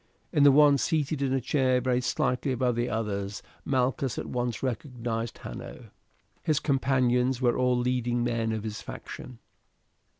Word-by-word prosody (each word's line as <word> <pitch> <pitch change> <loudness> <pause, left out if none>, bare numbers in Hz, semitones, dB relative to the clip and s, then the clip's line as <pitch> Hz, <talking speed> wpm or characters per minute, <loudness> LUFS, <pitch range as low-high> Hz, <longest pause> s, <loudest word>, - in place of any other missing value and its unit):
In 150 - +3
the 140 0 +8
one 145 0 +6
seated 155 -2 0
in 135 -2 +1
a 135 - +2
chair 130 0 +2
very 125 0 +1
slightly 125 +1 0
above 125 -1 +1
the 120 +1 -1
others 100 -2 -3 0.2
Malchus 130 -2 0
at - - -3
once 120 -2 -3
recognized 120 -3 -3
Hanno. - - -9 0.5
His 155 -3 +1
companions 130 -2 +2
were 120 -2 +2
all 125 -1 +2
leading 120 -1 0
men 115 -2 0
of 110 -1 -3
his 110 -1 -5
faction. 125 - -9
125 Hz, 155 wpm, -28 LUFS, 120-135 Hz, 0.5 s, the